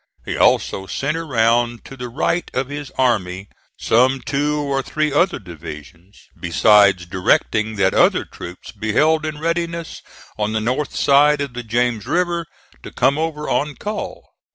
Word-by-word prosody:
He -, -, -3 dB
also 95 Hz, 0 st, +2 dB
sent 140 Hz, +9 st, -2 dB
around 120 Hz, -6 st, +1 dB
to 135 Hz, -, -10 dB
the 125 Hz, -2 st, -6 dB
right 165 Hz, +7 st, -1 dB
of 130 Hz, +1 st, -1 dB
his 145 Hz, -1 st, -6 dB
army 100 Hz, -7 st, 0 dB, 0.3 s
some 130 Hz, +4 st, +3 dB
two 145 Hz, +2 st, -1 dB
or 140 Hz, -2 st, -1 dB
three 150 Hz, +1 st, -1 dB
other 175 Hz, +6 st, +2 dB
divisions, 85 Hz, +2 st, -11 dB, 0.2 s
besides 100 Hz, +1 st, +4 dB
directing 105 Hz, +4 st, +1 dB
that 95 Hz, -2 st, +2 dB
other -, -, +3 dB
troops 90 Hz, +1 st, -10 dB
be 110 Hz, 0 st, -4 dB
held 155 Hz, +4 st, +3 dB
in 155 Hz, -1 st, -5 dB
readiness 170 Hz, +1 st, -3 dB, 0.4 s
on 105 Hz, +1 st, -1 dB
the 110 Hz, -, +1 dB
north 125 Hz, +6 st, -2 dB
side 145 Hz, +1 st, +4 dB
of 140 Hz, -3 st, -3 dB
the 125 Hz, -, -5 dB
James 120 Hz, -1 st, -1 dB
River 175 Hz, -2 st, 0 dB, 0.3 s
to -, -, -9 dB
come 140 Hz, +3 st, +2 dB
over 155 Hz, -2 st, -3 dB
on 145 Hz, 0 st, -1 dB
call. 210 Hz, +1 st, -5 dB
130 Hz, 155 wpm, -20 LUFS, 105-150 Hz, 0.4 s, besides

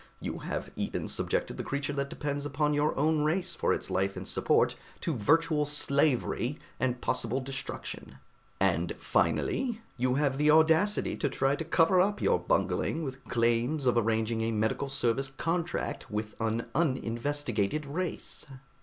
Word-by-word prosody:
You -, -, -4 dB
have -, -, -4 dB
even -, -, -3 dB
subjected -, -, -1 dB
the -, -, -3 dB
creature 140 Hz, 0 st, -2 dB
that 140 Hz, 0 st, -2 dB
depends 145 Hz, 0 st, -3 dB
upon 150 Hz, +1 st, 0 dB
your 145 Hz, +1 st, +1 dB
own 155 Hz, +2 st, +2 dB
race 175 Hz, +3 st, +1 dB
for -, -, 0 dB
its -, -, -2 dB
life 95 Hz, +1 st, 0 dB
and -, -, -6 dB
support -, -, +2 dB, 0.3 s
to 165 Hz, -, -1 dB
virtual 155 Hz, +6 st, +3 dB
slavery 140 Hz, -2 st, +2 dB, 0.2 s
and 125 Hz, -1 st, 0 dB
possible 120 Hz, +3 st, 0 dB
destruction; 135 Hz, 0 st, -6 dB, 0.4 s
and 90 Hz, -3 st, +1 dB
finally, 245 Hz, -4 st, 0 dB, 0.2 s
you 125 Hz, +1 st, +1 dB
had 140 Hz, -1 st, +1 dB
the 150 Hz, +1 st, +4 dB
audacity 160 Hz, +7 st, +4 dB
to 145 Hz, -, 0 dB
try 135 Hz, +1 st, +1 dB
to 160 Hz, -, -4 dB
cover 165 Hz, +3 st, +4 dB
up 205 Hz, +2 st, +1 dB
your -, -, +2 dB
bungling 335 Hz, -, 0 dB
with 135 Hz, -2 st, -6 dB
claims 120 Hz, +5 st, +1 dB
of 125 Hz, -, +3 dB
arranging 110 Hz, 0 st, +1 dB
a 115 Hz, 0 st, 0 dB
medical 110 Hz, +5 st, 0 dB
service 135 Hz, 0 st, 0 dB
contract 170 Hz, +1 st, -2 dB
with 105 Hz, 0 st, -3 dB
an 115 Hz, +1 st, 0 dB
uninvestigated 135 Hz, -3 st, 0 dB
race." 165 Hz, +4 st, -4 dB
140 Hz, 155 wpm, -29 LUFS, 120-155 Hz, 0.4 s, the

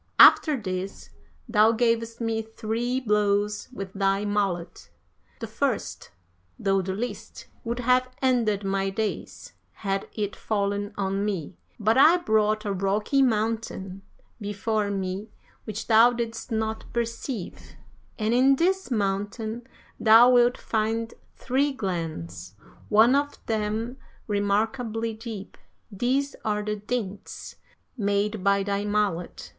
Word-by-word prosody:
After 305 Hz, -4 st, +7 dB
this, 185 Hz, -1 st, -5 dB, 0.4 s
thou 220 Hz, -1 st, +4 dB
gavest 230 Hz, 0 st, 0 dB
me 225 Hz, -1 st, -1 dB
three 225 Hz, +3 st, -2 dB
blows 210 Hz, -2 st, +1 dB
with 195 Hz, -6 st, -7 dB
thy 195 Hz, +1 st, +1 dB
mallet; 195 Hz, -5 st, -2 dB, 0.5 s
the -, -, -4 dB
first, -, -, -2 dB, 0.5 s
though 195 Hz, -1 st, +1 dB
the 190 Hz, +1 st, -3 dB
least, 215 Hz, -1 st, -6 dB, 0.2 s
would 235 Hz, +1 st, -3 dB
have 255 Hz, +1 st, +3 dB
ended 230 Hz, -6 st, +1 dB
my 195 Hz, 0 st, 0 dB
days 215 Hz, +1 st, -4 dB, 0.2 s
had 195 Hz, -1 st, -3 dB
it 205 Hz, -2 st, -3 dB
fallen 205 Hz, -1 st, -1 dB
on 195 Hz, 0 st, -1 dB
me, 190 Hz, -5 st, -3 dB, 0.2 s
but 220 Hz, +4 st, +3 dB
I 325 Hz, +5 st, +7 dB
brought 215 Hz, -8 st, +1 dB
a 200 Hz, -, -1 dB
rocky 200 Hz, +8 st, +1 dB
mountain 220 Hz, -5 st, -1 dB, 0.4 s
before 205 Hz, +1 st, -1 dB
me 195 Hz, +1 st, -3 dB, 0.4 s
which 215 Hz, 0 st, -5 dB
thou 230 Hz, +2 st, +6 dB
didst 235 Hz, 0 st, -4 dB
not 220 Hz, 0 st, -1 dB
perceive, 230 Hz, -3 st, -4 dB, 0.4 s
and 220 Hz, +1 st, 0 dB
in 265 Hz, +3 st, +5 dB
this 375 Hz, +4 st, +1 dB
mountain 215 Hz, +2 st, -2 dB, 0.3 s
thou 230 Hz, +3 st, +7 dB
wilt 245 Hz, 0 st, +4 dB
find 225 Hz, +1 st, -1 dB, 0.2 s
three 275 Hz, +3 st, 0 dB
glens, 160 Hz, -, -5 dB, 0.3 s
one 220 Hz, +4 st, +6 dB
of 285 Hz, +1 st, 0 dB
them 220 Hz, +3 st, -2 dB, 0.3 s
remarkably 220 Hz, +3 st, -1 dB
deep. 220 Hz, -3 st, -8 dB, 0.3 s
These 260 Hz, +7 st, 0 dB
are 210 Hz, -1 st, -1 dB
the 210 Hz, 0 st, -2 dB
dints 210 Hz, -2 st, -5 dB, 0.4 s
made 205 Hz, -2 st, 0 dB
by 200 Hz, 0 st, +3 dB
thy 200 Hz, 0 st, -1 dB
mallet. 205 Hz, -5 st, -1 dB
215 Hz, 120 wpm, -26 LUFS, 200-230 Hz, 0.5 s, After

